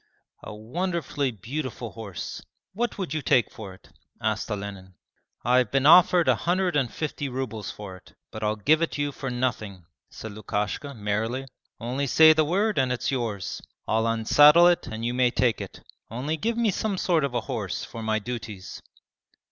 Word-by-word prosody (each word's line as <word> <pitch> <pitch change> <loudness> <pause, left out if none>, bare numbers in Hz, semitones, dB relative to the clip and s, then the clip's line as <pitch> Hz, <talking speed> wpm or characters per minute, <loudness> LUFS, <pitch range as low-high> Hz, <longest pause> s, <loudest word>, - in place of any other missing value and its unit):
'A 105 - -8
wonderfully 145 - -2
beautiful 120 +2 -5
horse! 100 -6 -7 0.3
What 235 +4 -2
would 185 -7 -3
you 155 - -1
take 125 -3 +2
for 105 -3 -9
it?' - - -22 0.3
asked - - -1
Olenin. 100 -2 -6 0.5
'I 125 +1 +4
have 125 -4 0
been 135 0 +1
offered 175 +2 +7
a - - +6
hundred 180 0 0
and 135 -5 +1
fifty 145 -2 -4
rubles 120 -5 -4
for 95 -3 -8
it, - - -21 0.2
but 110 - -7
I'll 105 0 +1
give 150 +10 +3
it 165 - -1
you 145 0 -1
for 135 -1 -5
nothing,' 110 -7 -3 0.2
said 110 - -8
Lukashka, 105 +7 -3
merrily. 110 +5 -2 0.3
'Only 130 +4 -2
say 160 +4 +7
the 155 0 +3
word 195 +4 +1
and 130 -1 +1
it's 125 - -1
yours. 115 -7 -3 0.3
I'll 110 +1 +1
unsaddle 145 +9 +6
it 175 - 0
and 110 +1 -5
you 120 - -1
may 125 0 +3
take 120 -2 +1
it. - - -9 0.3
Only 130 +7 -2
give 225 +7 -2
me 230 -3 +2
some 200 +1 -2
sort 170 -4 +1
of 135 -3 -2
a 120 - +1
horse 110 -9 -4
for 115 - -8
my 110 0 0
duties.' 110 -4 -7
125 Hz, 180 wpm, -26 LUFS, 110-155 Hz, 0.5 s, offered